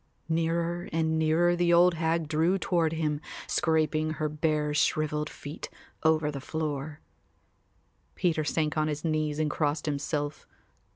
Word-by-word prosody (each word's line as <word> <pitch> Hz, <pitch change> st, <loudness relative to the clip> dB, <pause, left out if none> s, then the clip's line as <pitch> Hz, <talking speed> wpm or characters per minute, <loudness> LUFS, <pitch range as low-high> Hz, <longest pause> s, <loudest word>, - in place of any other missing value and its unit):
Nearer 165 Hz, +1 st, 0 dB
and 160 Hz, 0 st, +1 dB
nearer 165 Hz, +3 st, +3 dB
the 175 Hz, 0 st, +2 dB
old 175 Hz, +1 st, +6 dB
hag 165 Hz, -1 st, 0 dB
drew 160 Hz, +5 st, +2 dB
toward 170 Hz, -4 st, +1 dB
him, 155 Hz, -2 st, -1 dB, 0.2 s
scraping 155 Hz, -1 st, +1 dB
her 155 Hz, -1 st, -1 dB
bare 150 Hz, 0 st, 0 dB
shrivelled 150 Hz, 0 st, +1 dB
feet 145 Hz, +3 st, -8 dB, 0.3 s
over 155 Hz, -1 st, +2 dB
the 140 Hz, -2 st, -6 dB
floor. 150 Hz, 0 st, -4 dB, 1.1 s
Peter 160 Hz, -3 st, +1 dB
sank 155 Hz, 0 st, 0 dB
on 155 Hz, -, +1 dB
his 150 Hz, +1 st, -3 dB
knees 155 Hz, -2 st, 0 dB
and 155 Hz, -1 st, 0 dB
crossed 150 Hz, -1 st, 0 dB
himself. 145 Hz, 0 st, -2 dB
155 Hz, 135 wpm, -28 LUFS, 150-165 Hz, 1.1 s, old